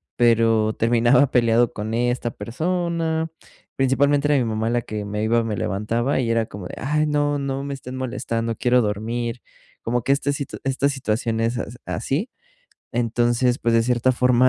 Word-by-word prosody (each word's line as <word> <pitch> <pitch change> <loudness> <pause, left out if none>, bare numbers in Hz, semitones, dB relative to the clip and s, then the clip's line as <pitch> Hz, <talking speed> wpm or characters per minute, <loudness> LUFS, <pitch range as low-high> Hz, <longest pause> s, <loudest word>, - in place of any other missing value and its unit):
pero 115 -2 +3
terminaba 120 +4 +3
peleado 120 -1 +3
con 110 +1 -4
esta 120 0 0
persona. 165 - -2 0.5
Principalmente, 140 +2 +2
era 145 - +4
mi - - 0
mamá, 110 +1 -1
la 120 0 +1
que 105 -1 -5
me 105 +1 -3
iba 115 +1 +2
me 110 -2 -3
levantaba, 115 +7 -1
y 120 - 0
era 115 -1 +2
como 100 -4 -8
de: - - -8
"Ay, 150 +3 0
no, 145 -1 +1
no 135 0 -3
me 140 - -4
estén 130 -1 -8
molestando, 115 -3 -2
quiero 125 0 +3
dormir". 115 +3 -2 0.4
Como 120 0 -1
que 135 - +1
esta 140 0 0
si 140 0 -3 0.2
esta 135 +1 +1
situación 115 -4 -1
e - - +2
es 120 0 -2 0.3
así. 145 - -2 0.6
Entonces, 120 +1 +1
pues, 115 - 0
de 115 - +4
cierta 125 +1 +2
forma, 125 0 +4
120 Hz, 175 wpm, -22 LUFS, 115-135 Hz, 0.6 s, era